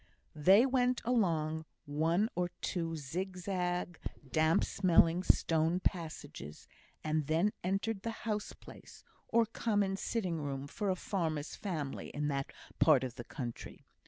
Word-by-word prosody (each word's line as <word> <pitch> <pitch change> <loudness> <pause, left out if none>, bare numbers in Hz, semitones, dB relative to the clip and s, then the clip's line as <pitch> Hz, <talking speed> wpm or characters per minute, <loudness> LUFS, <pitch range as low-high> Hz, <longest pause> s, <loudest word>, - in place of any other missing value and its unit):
They 190 - +6
went 250 -1 +2
along 160 -9 +1 0.2
one 165 +8 +2
or 175 0 0
two 165 -3 -2
zigzag, 180 +3 -3 0.3
damp 160 +1 +3
smelling 175 -2 +4
stone 165 -1 +2
passages, 155 - -4 0.4
and 155 -2 0
then 165 +7 +2
entered 195 +3 -1
the 230 - -3 0.2
house 210 -2 -1
place, - - -14 0.2
or 230 0 +4
common 205 -3 0
sitting 185 -8 -2
room 140 -1 -3
for 200 +8 -3
a 185 - +2
farmer's 160 -6 -2
family 155 -9 -4
in 150 0 0
that 140 -1 -2 0.3
part 130 - +6
of 125 -2 -3
the 120 -1 -8
country. 120 -4 -7
170 Hz, 130 wpm, -33 LUFS, 155-195 Hz, 0.4 s, They